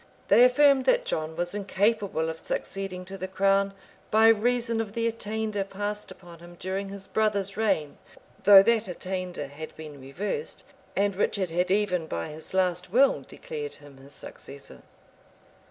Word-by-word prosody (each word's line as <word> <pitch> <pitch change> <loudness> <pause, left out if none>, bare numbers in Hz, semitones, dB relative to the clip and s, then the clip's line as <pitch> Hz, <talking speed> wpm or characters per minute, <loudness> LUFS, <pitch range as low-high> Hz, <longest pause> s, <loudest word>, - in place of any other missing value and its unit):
They 240 - +7
affirmed 265 +1 +5
that - - +3
John 155 - -2
was 175 +2 -2
incapable 200 -3 0
of 160 0 -4
succeeding 195 -2 -4
to 195 +1 -8
the 185 - -3
crown, 195 +1 +2 0.4
by 220 +1 +6
reason 230 +1 +2
of 210 -3 -6
the 230 0 -1
attainder 220 -2 -2
passed 205 +2 -4
upon 175 -2 -13
him 175 +1 -13
during 195 +2 -3
his 195 -1 -9
brother's 205 -3 0
reign; 195 -9 0 0.4
though 200 -1 +9
that 230 0 +2
attainder 180 -2 -4
had 145 +3 -9
been 150 -3 -10
reversed, 200 - -4 0.3
and 200 0 +1
Richard 190 -2 0
had 180 +2 0
even, 185 -4 +1
by 85 - -4
his 155 +4 -7
last 180 -1 0
will, 265 +5 +4
declared 455 -3 -7
him 145 -2 -15
his 135 +1 -15
successor. 140 0 -10
195 Hz, 155 wpm, -27 LUFS, 175-220 Hz, 0.4 s, though